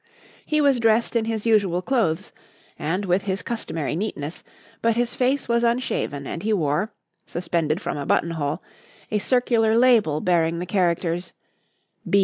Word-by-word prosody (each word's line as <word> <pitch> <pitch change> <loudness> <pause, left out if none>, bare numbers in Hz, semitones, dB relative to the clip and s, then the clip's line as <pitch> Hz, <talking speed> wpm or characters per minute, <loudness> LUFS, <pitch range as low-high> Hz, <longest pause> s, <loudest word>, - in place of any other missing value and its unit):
He 305 -1 +1
was 280 -4 +3
dressed 230 +1 +2
in 230 -1 +2
his 225 -1 -3
usual 200 -6 +2
clothes 205 -9 0 0.5
and 180 +7 -1
with 185 +2 +1
his 195 0 -2
customary 165 -11 -3
neatness, 165 -5 -4 0.4
but 230 -1 +2
his 240 0 0
face 265 +2 0
was 235 0 +2
unshaven 235 - -1
and 165 - -5
he 220 +3 0
wore, 170 +3 0 0.4
suspended 165 -2 -1
from 200 - -4
a 140 - -4
button 170 - +2
hole, 150 -2 -3 0.5
a 210 - +1
circular 230 -1 +2
label 230 -11 +4
bearing 170 -1 +1
the 175 - -3
characters 175 -2 0 0.8
"B. 200 - +5
200 Hz, 155 wpm, -23 LUFS, 170-230 Hz, 0.8 s, B